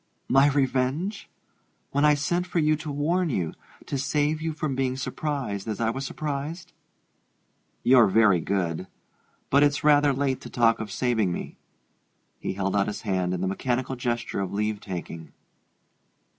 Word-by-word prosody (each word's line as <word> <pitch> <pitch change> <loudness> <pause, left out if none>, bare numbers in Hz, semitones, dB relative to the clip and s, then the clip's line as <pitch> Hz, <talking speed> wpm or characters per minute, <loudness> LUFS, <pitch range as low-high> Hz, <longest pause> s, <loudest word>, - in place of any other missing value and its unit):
"My 135 +2 +5
revenge? 140 +7 0 0.6
When 140 +2 +2
I 150 0 +6
sent 175 +5 -1
for 180 - -3
you 155 -1 +3
to 155 0 -6
warn 165 +5 0
you 90 - -1 0.3
to 140 - -3
save 150 +3 0
you 160 0 -1
from 150 -2 -3
being 130 -1 -1
surprised 130 -7 -3
as 110 -2 -3
I 115 -1 +1
was 135 +2 -4
surprised?" 150 +4 -5 1.1
"You're 125 -2 +6
very 100 -2 +4
good 90 0 -2 0.6
but 140 - +5
it's 145 0 +2
rather 145 -1 +5
late 135 -1 -1
to - - -9
talk 115 -1 +3
of 110 -2 -5
saving 110 -6 +1
me." - - -6 0.8
He - - -3
held 95 0 -1
out 100 -1 +2
his 105 - -4
hand 95 -3 0
in 90 - -4
the 95 - 0
mechanical 125 +6 -1
gesture 120 -4 -2
of 95 -2 -2
leave 105 +1 -1
taking. 85 -5 -7
130 Hz, 160 wpm, -26 LUFS, 100-145 Hz, 1.1 s, I